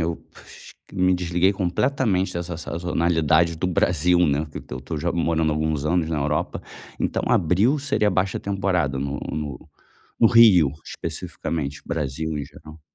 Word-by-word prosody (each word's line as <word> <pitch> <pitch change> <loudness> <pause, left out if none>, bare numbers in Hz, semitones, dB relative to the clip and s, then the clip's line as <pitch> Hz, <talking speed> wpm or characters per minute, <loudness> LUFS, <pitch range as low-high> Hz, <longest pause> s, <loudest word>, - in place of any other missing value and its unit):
eu 80 0 -2 0.7
me 90 -1 +2
desliguei 90 +2 +1
completamente 95 0 0
dessa 85 -1 -4
sazonalidade 85 -1 +1
do 90 - -1
Brasil, 90 0 +2
né, 75 +1 0
porque - - -10
eu - - -4
estou 75 +5 -5 0.2
morando 80 -2 +1
alguns 75 -1 -1
anos 80 0 +1
na 80 - -1
Europa. 75 +1 -2 0.4
Então, - - -1
abril 95 - +2
seria 135 -7 +1
baixa 95 +1 0
temporada 90 -8 -1
no 70 +1 -3 1.0
no 115 - +7
Rio, 100 - +6
especificamente, 75 -1 -5
Brasil 80 0 -3
em 70 - -3
geral. 75 +3 -14
85 Hz, 135 wpm, -23 LUFS, 75-95 Hz, 1.0 s, no